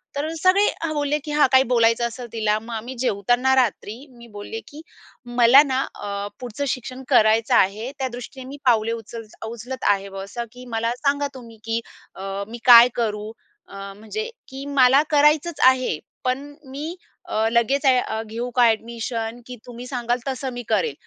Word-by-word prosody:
तर 290 +2 -2
सगळे 370 +5 +4 0.2
हां, 315 -1 -1
बोलले, 295 0 0
की 300 - -5
"हां, 295 -2 +4
काही 260 0 +6
बोलायचं 230 0 +3
असेल 240 +1 -8
तिला." 215 -1 +1
मग 225 0 -6
मी 255 +2 -7
जेवताना 245 +3 +1
रात्री 230 -3 0 0.2
मी 235 0 -13
बोलले, 205 +2 -6
की 300 +2 -11 0.5
"मला 245 +3 +8
ना, 265 -2 -1 0.2
अ, 200 0 -5
पुढचं 250 +4 -4
शिक्षण 255 +1 -4
करायचं 220 -2 +4
आहे 215 +7 +2
त्यादृष्टीने 255 0 -6
मी 285 - -8
पावले 230 -2 +3
उचल 230 0 -6 0.2
उचलत 235 +3 -7
आहे 195 0 -1
असं 235 +4 -6
की 250 0 -12
मला 230 +1 0
सांगा 285 +1 0
तुम्ही 230 -3 -12
की 225 0 0 0.4
अ, 195 +1 -5
मी 235 +2 -8
काय 240 -1 +10
करू? 215 -2 -2 0.4
अ, 195 0 -9
म्हणजे 435 - -5 0.2
की 270 +1 -8
मला 260 +3 +6
करायचंच 300 +2 +3
आहे 255 -12 +2 0.2
पण 275 +3 -2 0.2
मी 305 +6 -5 0.3
अ, 220 +1 +1
लगेच 265 +5 +1
अ, 250 -4 +2
घेऊ 235 +3 -5
का 245 -2 +6
एडमिशन 230 +1 -4
की 250 - -7
तुम्ही 245 0 -9
सांगाल 245 -1 -1
तसं 265 0 -3
मी 245 - -5
करेल. 465 - +1
245 Hz, 170 wpm, -22 LUFS, 225-265 Hz, 0.5 s, काय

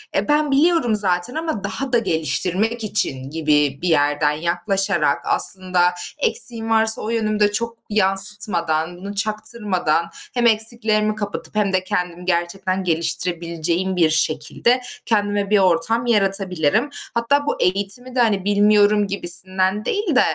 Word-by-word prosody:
e, - - 0
ben 295 -1 +1
biliyorum 290 -5 +3
zaten 190 +4 0
ama 315 -10 -3
daha 250 +6 -4
da 240 - +5
geliştirmek 190 - -1
için 135 -11 -2
gibi 150 -3 +1
bir 180 - -2
yerden 145 -1 +2
yaklaşarak 175 0 0
aslında 180 -1 +1 0.2
eksiğim 230 -5 -2
varsa 220 0 +3
o 215 - -4
yönümü 215 -2 -1
de 210 0 +3
çok 230 +2 -3
yansıtmadan, 190 -5 0
bunu 200 +2 -8
çaktırmadan, 205 -6 -1 0.3
hem 240 -1 +2
eksiklerimi 215 -1 +2
kapatıp 205 0 -6
hem 200 -2 0
de 185 - +1
kendimi 180 -1 -3
gerçekten 185 +2 -1
geliştirebileceğim 170 +2 0
bir 165 -3 +3
şekilde 160 +10 +1 0.2
kendime 205 -2 0
bir 210 - +4
ortam 190 +6 +1
yaratabilirim. 195 - +1 0.2
Hatta 280 +5 +1
bu - - -2
eğitimi 200 +7 -1
de, - - 0
hani, 210 -5 +1
bilmiyorum 205 0 +3
gibisinden 185 +2 0
değil 405 -7 -1
de, 270 - +6
200 Hz, 135 wpm, -20 LUFS, 175-220 Hz, 0.3 s, de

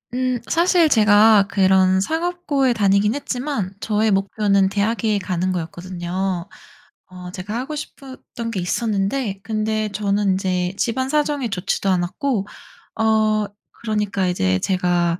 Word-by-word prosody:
음 255 -1 0
사실 340 -1 +3
제가 210 -2 +5
그런 190 -1 +3
상업고에 320 - 0
다니긴 205 +1 +2
했지만 250 -8 -3
저의 215 0 +1
목표는 195 0 +2
대학에 215 0 0
가는 185 0 -2
거였거든요. 180 +1 -4 0.6
어 180 -1 -10
제가 195 +4 -6
하고 270 +4 -4
싶었던 265 -5 -8
게 200 -5 -3
있었는데 200 +2 -1
근데 215 -1 -1
저는 200 -1 0
인제 185 -1 -1
집안 260 +4 -1
사정이 295 -4 0
좋지도 195 0 -2
않았고 195 - 0 0.5
어 215 -1 +2 0.3
그러니까 210 -4 -1
이제 95 - +1
제가 175 - 0
205 Hz, 280 characters per minute, -21 LUFS, 185-235 Hz, 0.6 s, 제가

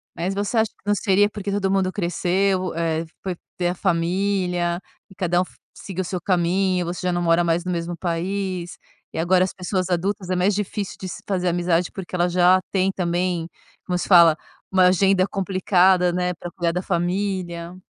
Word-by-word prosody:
Mas 180 +3 -2
você 205 +3 -2
acha 220 -1 +2
que - - -43
não 205 0 +2
seria 205 0 +3
porque 205 -1 -5
todo 195 -1 0
mundo 190 -1 +1
cresceu, 185 0 0
é 165 0 -1 0.2
foi 185 -2 -3 0.2
ter 175 -1 0
a 180 - -2
família, 180 0 0 0.3
e 190 - -16
cada 180 -2 +1
um 185 - -1
fo - - -20 0.2
seguiu 190 -2 -5
o - - -2
seu 180 0 -3
caminho, 180 0 +1
você 175 +1 -4
já 180 - +1
não 175 - 0
mora 170 0 +3
mais 170 0 +1
no 180 - -3
mesmo 170 0 -3
país, 180 +1 -3 0.4
e - - -6
agora 180 +2 +3
as - - -6
pessoas 185 0 -2
adultas 185 +2 -1
é 185 - +1
mais 185 +3 +2
difícil 205 0 -3
de 190 - -5
se - - -8
fazer 185 -2 0
amizade, 175 0 +1
porque 190 -1 -7
elas 175 0 +1
já 180 +1 +5
tem 190 0 +2
também, 175 -2 -1 0.4
como 180 -1 -1
se - - -3
fala, 170 -4 +7 0.4
uma 185 -1 +5
agenda 190 0 +3
complicada, 185 -2 +2
né, 180 0 -1
pra 175 +1 -8
cuidar 170 -2 -1
da 180 - -1
família. 180 -1 -2
180 Hz, 200 wpm, -22 LUFS, 175-190 Hz, 0.4 s, fala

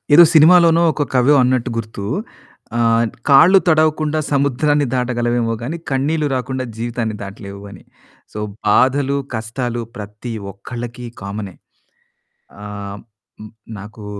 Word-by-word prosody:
ఏదో 170 - +10
సినిమాలోనో, 165 +1 +6
ఒక 145 - -1
కవో 130 +3 +4
అన్నట్టు 125 -1 +1
గుర్తు 110 -3 -5 0.7
ఆహ్, 115 0 +3 0.2
కాళ్ళు 165 +8 +7
తడవకుండా 155 -1 +2
సముద్రాన్ని 145 +1 +1
దాటగలవేమో 120 -2 0
గాని 145 +8 -4
కన్నీళ్లు 145 +3 0
రాకుండా 130 0 -3
జీవితాన్ని 115 -1 -3
దాటలేవు 100 0 -9
అని. 95 -4 -13 0.5
సో, 105 - -7 0.3
బాధలు 135 +5 +3 0.2
కష్టాలు 120 +2 -3 0.2
ప్రతి 105 +3 -7 0.2
ఒక్కలకి 120 +4 -8 0.2
కామనే. 100 -1 -6 1.1
ఆహ్, 100 -1 -7 0.8
నాకు 105 +1 -11
125 Hz, 105 wpm, -18 LUFS, 110-145 Hz, 1.1 s, ఏదో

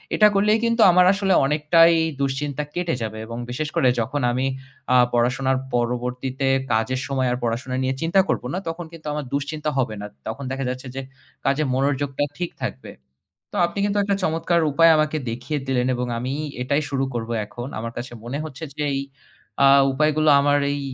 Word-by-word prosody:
এটা 210 - +7
করলেই 210 +2 +3
কিন্তু 230 0 +2
আমার 180 +1 +5
আসলে 195 -1 +1
অনেকটাই 155 +3 +5 0.3
দুশ্চিন্তা 140 +1 -1
কেটে 175 -5 -1
যাবে 110 -1 -4
এবং 115 +1 -7
বিশেষ 150 +5 -3
করে 130 - +3
যখন 135 +5 -1
আমি 130 +2 0 0.5
আ 125 - +6 0.2
পড়াশোনার 130 +2 +1 0.2
পরবর্তীতে 125 +2 -2 0.3
কাজের 120 +4 0
সময় 130 -2 0
আর 125 - -1
পড়াশোনা 120 +2 -2
নিয়ে 130 0 0
চিন্তা 165 +4 +2
করব - - 0
না, 185 - -1
তখন 165 +1 -5
কিন্তু 160 -2 -10
আমার 150 -1 -3
দুশ্চিন্তা 150 +2 -2
হবে 120 -5 0
না। 105 - -5 0.2
তখন 110 +6 -5
দেখা 135 0 -3
যাচ্ছে 130 +1 -5
যে 135 - -3 0.4
কাজে 140 +3 +2
মনোযোগটা 140 +1 0
ঠিক 175 -1 -2
থাকবে। 65 0 -5 0.6
তো - - -5
আপনি 175 +3 -7
কিন্তু 205 0 0
একটা 200 0 0
চমৎকার 165 +1 +1
উপায় 165 +3 +6
আমাকে 155 0 +1
দেখিয়ে 125 +6 -3
দিলেন 125 -2 +1
এবং 125 0 -2
আমি 125 +3 -3 0.3
এটাই 140 +4 0
শুরু 135 -1 0
করব 115 -1 -4 0.2
এখন। 120 +3 -7
আমার 115 +1 -5
কাছে 120 +1 -6
মনে 130 +4 -4
হচ্ছে 155 0 -7
যে 150 - -1
এই - - 0 0.6
আ - - +8 0.2
উপায়গুলো 155 +2 +2
আমার 145 0 +3
এই 145 - -2
140 Hz, 185 wpm, -23 LUFS, 125-155 Hz, 0.6 s, আ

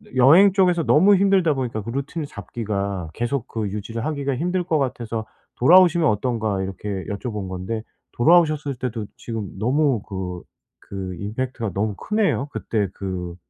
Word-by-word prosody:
여행 160 +11 +7
쪽에서 180 -4 +3
너무 190 +7 +5
힘들다 190 -5 +3
보니까 120 -5 -3
그 115 - -7
루틴을 140 +5 -4
잡기가 100 - -4
계속 120 - -2
그 110 -2 -3
유지를 110 +4 -5
하기가 140 -3 -1
힘들 180 +5 -1
것 165 -3 0
같아서 115 -4 -3 0.3
"돌아오시면 170 +3 +6
어떤가?" 110 -2 -1
이렇게 95 +2 -5 0.2
여쭤본 105 -1 -4
건데 95 +5 -4 0.3
돌아오셨을 155 0 +3
때도 115 -3 -4
지금 110 -4 -5
너무 130 +2 +1
그 90 -3 -6 0.5
그 95 -2 -5
임팩트가 115 +1 -3
너무 105 +1 -1
크네요. 205 - 0
그때 105 -3 -1
그 90 -3 -5
120 Hz, 340 characters per minute, -22 LUFS, 100-150 Hz, 0.5 s, 여행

